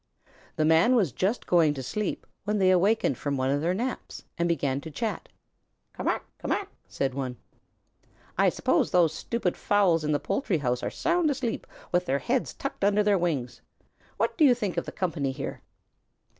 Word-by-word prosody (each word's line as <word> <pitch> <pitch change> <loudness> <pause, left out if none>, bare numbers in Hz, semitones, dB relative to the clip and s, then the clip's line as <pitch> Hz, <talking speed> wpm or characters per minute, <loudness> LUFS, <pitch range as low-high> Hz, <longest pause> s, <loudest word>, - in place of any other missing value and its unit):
The 155 - +1
Man 165 +10 +5
was 195 - +2
just 195 - -1
going 160 -4 +4
to 135 - -5
sleep 205 +10 -3 0.2
when 210 0 0
they 190 -2 +4
awakened 185 - +2
from 140 -1 -2
one 130 +1 +1
of 145 +1 +1
their 175 +3 +1
naps 250 +5 -4
and 170 0 0
began 140 -5 0
to 160 - -8
chat. 210 +4 -4 0.6
"Ca - - -8
mac! - - -1
Ca - - -6
mac!" - - -1 0.2
said 135 -1 -2
one. 130 -2 -4 1.0
"I - - +4
suppose - - +1
those 170 -3 +3
stupid 190 +1 -2
fowls 190 -6 +2
in 150 - 0
the 145 - +2
poultry 225 - -1
house 125 -4 -1
are - - -2
sound 345 -2 +1
asleep, 260 -5 -2 0.2
with 180 0 +1
their 135 - +2
heads 245 - -1
tucked 275 - -5
under 205 +1 +4
their 205 -2 +3
wings. 135 -8 -2 0.6
What - - 0
do - - +6
you 260 -4 +7
think 210 -6 -3
of - - -1
the - - -6
company 160 -7 -1
here?" 135 +1 -6
175 Hz, 190 wpm, -27 LUFS, 145-210 Hz, 1.0 s, you